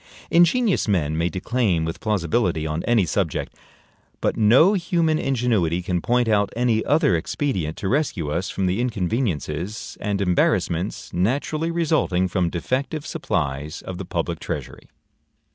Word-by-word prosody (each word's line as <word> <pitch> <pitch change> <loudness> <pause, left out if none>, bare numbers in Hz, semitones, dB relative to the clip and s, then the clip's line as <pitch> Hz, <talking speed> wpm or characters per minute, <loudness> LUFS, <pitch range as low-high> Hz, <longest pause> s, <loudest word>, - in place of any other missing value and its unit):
Ingenious 180 - +3
men 80 -7 +1
may 85 +2 +1
declaim 95 -2 0
with 80 - -4
plausibility 90 -4 0
on 80 +1 -2
any 115 -5 +3
subject; 85 -2 -2 0.7
but - - 0
no 125 - +5
human 170 -4 +1
ingenuity 110 - 0
can 90 -1 -1
point 120 +3 +1
out 105 -2 +2
any 115 -2 +1
other 150 - +3
expedient 85 - -2
to 95 - -3
rescue 110 - 0
us 85 +5 -2
from 95 - -2
the 95 +5 0
inconveniences 100 - -2
and 100 -2 -1
embarrassments 90 0 0
naturally 140 - 0
resulting 155 - +1
from 90 -1 0
defective 135 - -2
supplies 75 - -3
of 90 -1 -6
the 95 - -5
public - - -3
treasury. - - -6
100 Hz, 140 wpm, -23 LUFS, 85-130 Hz, 0.7 s, no